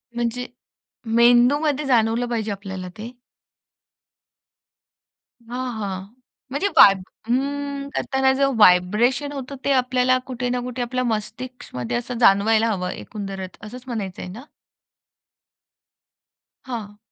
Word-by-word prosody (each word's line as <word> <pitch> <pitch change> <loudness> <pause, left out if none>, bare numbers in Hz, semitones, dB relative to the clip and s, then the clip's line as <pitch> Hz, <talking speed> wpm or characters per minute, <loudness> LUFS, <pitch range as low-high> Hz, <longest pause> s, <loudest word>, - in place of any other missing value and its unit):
म्हणजे 240 +1 -2 0.7
मेंदूमध्ये 260 +5 +4
जाणवलं 235 -1 +2
पाहिजे 220 -2 -2
आपल्याला 190 -2 -6
ते? 230 +3 -6 2.4
हां, 250 +1 -4
हां. 190 -2 -4 0.5
म्हणजे 285 +9 0
वाईब 195 -1 +8 0.3
अं 280 +2 -2
करताना 265 0 +2
जो 275 0 +3
व्हायब्रेशन 215 +9 +4
होतो 275 0 -6
ते 280 - +2
आपल्याला 255 -1 +3
कुठे 250 -1 -3
ना 250 0 0
कुठे 250 0 -5
आपल्या 255 +1 -1
मस्तिष्कमध्ये 215 - -4
असं 240 0 -5
जाणवायला 220 +1 +4
हवं 180 -3 -2
एकंदरच, 195 -3 -7
असंच 245 +4 -9
म्हणायचंय 200 -7 -5
ना? 215 +8 -9 2.2
हां. 210 -5 -6
240 Hz, 105 wpm, -22 LUFS, 210-255 Hz, 2.4 s, वाईब